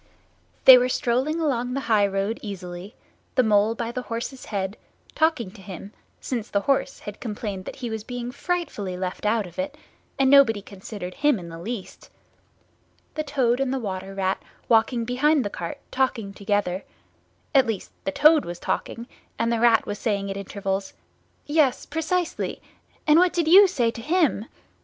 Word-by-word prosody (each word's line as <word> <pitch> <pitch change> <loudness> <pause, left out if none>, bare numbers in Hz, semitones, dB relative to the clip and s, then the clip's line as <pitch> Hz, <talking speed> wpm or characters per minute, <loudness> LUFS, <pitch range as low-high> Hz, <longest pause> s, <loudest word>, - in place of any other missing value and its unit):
They 260 -1 +11
were 250 +1 +1
strolling 260 +7 0
along 250 -5 0
the 275 - -1
high 215 -5 +3
road 195 +3 -2
easily, 185 -1 -7 0.4
the 255 - +4
Mole 215 0 +3
by 230 0 -3
the 250 - -4
horse's 240 +2 -5
head, 195 -1 -3 0.4
talking 315 - +1
to 195 - -14
him, 190 +2 -9 0.3
since 235 -4 -4
the 200 - +1
horse 275 +2 0
had 210 0 -8
complained 205 -4 -5
that - - -7
he 245 -3 -5
was 220 -1 -4
being 245 0 -5
frightfully 280 - -3
left 185 +2 -3
out 215 -1 +1
of 175 +5 -11
it, 290 +1 -3 0.4
and 270 - +3
nobody 270 -6 +6
considered 195 -2 -8
him 295 +1 +2
in 175 -3 -8
the 165 0 -9
least; 210 +2 -7 1.0
the 310 - -2
Toad 265 -5 +1
and 270 -1 0
the 270 - 0
Water 195 -4 -5
Rat 190 -1 -1 0.3
walking 230 +1 +3
behind 270 +3 +2
the 205 - -3
cart 170 -1 -5
talking 240 -6 -1
together—at 205 - -2
least 220 -5 -3
Toad 305 +10 +5
was 175 0 -6
talking, 235 +6 -3 0.3
and 230 0 0
Rat 235 -2 +5
was 205 0 -5
saying 200 -3 -1
at - - -4
intervals, 195 0 -3 0.5
"Yes, 290 -4 +2
precisely; 330 +2 -2 0.5
and 305 +1 +6
what 360 0 +4
did 340 -3 0
you 390 +5 +9
say 245 -10 +1
to 230 - -8
_him? 305 - +1
230 Hz, 165 wpm, -24 LUFS, 200-270 Hz, 1.0 s, They